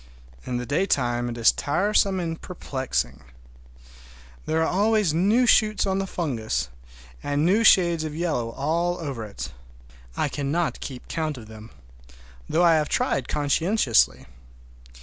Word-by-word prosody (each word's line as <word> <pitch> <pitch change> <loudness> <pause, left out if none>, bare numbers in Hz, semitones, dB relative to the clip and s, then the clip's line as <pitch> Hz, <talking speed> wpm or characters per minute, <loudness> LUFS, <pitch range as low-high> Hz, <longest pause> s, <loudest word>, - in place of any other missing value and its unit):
In 125 - -2
the 125 - -4
daytime 120 -6 0
it 120 - -6
is 115 - +5
tiresome 195 +4 +1
and 165 -2 -4
perplexing. 130 - -3 1.3
There 160 +1 +1
are - - +1
always 205 -3 +2
new 205 +9 +3
shoots 215 -4 +3
on 190 0 0
the 195 - -2
fungus, 115 - -2 0.5
and 145 +1 0
new 205 +6 +3
shades 170 -6 +5
of 155 -1 -5
yellow 155 -9 -1
all 170 +5 -1
over 140 -8 -5
it. 100 -7 -7 0.7
I - - +1
cannot 150 +4 -2
keep 130 -3 -8
count 155 -3 -3
of 115 - -10
them, 110 0 -12 0.8
though 170 - +2
I 170 -1 +6
have 150 -1 -1
tried 130 -3 0
conscientiously. 150 - +1
155 Hz, 140 wpm, -24 LUFS, 125-180 Hz, 1.3 s, I